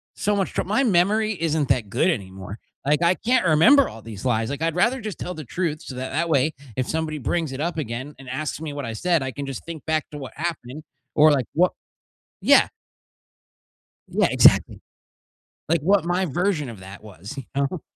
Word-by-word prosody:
so 210 0 0
much 195 -2 -1
troub - - -2
my 215 +7 +2
memory 215 +1 +2
isn't 155 -4 0
that 110 -5 +1
good 125 - +2
anymore. 95 - -5 0.3
Like, 150 +3 +2
I 170 +2 +4
can't 245 -3 +1
remember 210 - +6
all 115 - -11
these 110 -2 -9
lies. 115 -3 +1
Like, 140 +2 -4
I'd 165 0 0
rather 235 +9 +2
just 215 -2 -5
tell 180 - -5
the 155 -5 -8
truth 155 +2 -2
so 130 - -8
that 130 +1 -5
that 170 +5 0
way, 150 +1 +2 0.2
if 130 - -1
somebody 160 -1 -2
brings 155 0 -2
it 130 - -5
up 170 +1 -2
again 130 0 -4
and 135 -2 -11
asks 155 -1 -3
me 155 -3 -5
what 145 - -5
I 115 - -4
said, 170 +3 +1
I 130 - -3
can 140 +4 -6
just 135 -3 -6
think 165 -3 -8
back 155 -1 0
to 150 - -7
what 130 -5 -8
happened 155 -3 -5 0.3
or, 155 0 +7
like, 135 -5 +1
what 180 +3 +4 0.7
Yeah. - - +6 1.4
Yeah, - - +2
exactly. - - +4 0.9
Like, 165 -2 +2
what 195 +4 +3
my 175 +2 +1
version 170 -2 -1
of 110 -5 -9
that 95 +3 -11
was, 100 - -10
you 135 - -5
know? 140 +4 -1
155 Hz, 205 wpm, -23 LUFS, 130-175 Hz, 1.4 s, or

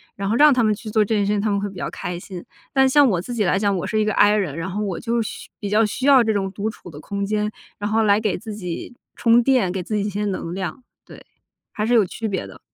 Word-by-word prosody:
然 195 0 -3
后 225 - +1
让 295 +1 +7
他 250 - +2
们 215 - +3
去 215 +1 -8
做 215 -1 +3
这 220 +2 -1
件 205 - +1
事 205 - 0
情， 205 -1 +1
他 215 - 0
们 200 0 +1
会 205 - -2
比 195 - -13
较 175 - -4
开 175 -1 -5
心。 180 -2 -9 0.3
但 265 -1 +4
像 285 +1 +5
我 180 -4 +1
自 240 +7 -6
己 215 -4 0
来 180 - +2
讲， 200 -1 +1
我 - - -3
是 215 - 0
一 215 - +2
个 215 - 0
I 205 +1 +5
人， 180 -9 -1
然 175 +3 -4
后 210 +3 -3
我 190 -4 -3
就 230 0 -1
需 - - -8
比 205 - -4
较 220 +2 +4
需 235 +6 -3
要 270 -4 +7
这 220 -1 +1
种 195 -1 -1
独 210 +2 -3
处 180 -5 -11
的 145 - -10
空 200 +3 -4
间， 210 +1 -1 0.3
然 205 - -2
后 220 +1 +2
来 205 0 +4
给 210 -3 0
自 215 +3 -8
己 180 +2 -6 0.2
充 235 0 +4
电， 245 -8 +2
给 190 -1 -3
自 215 +5 -4
己 205 - +1
一 - - -1
些 205 +1 -3
能 185 -4 -3
量。 195 +7 -5 0.2
对， - - -14 0.5
还 210 - -3
是 240 - +3
有 215 -4 +5
区 220 +5 -5
别 195 -2 -3
的。 - - -12
210 Hz, 325 characters per minute, -22 LUFS, 195-225 Hz, 0.5 s, 让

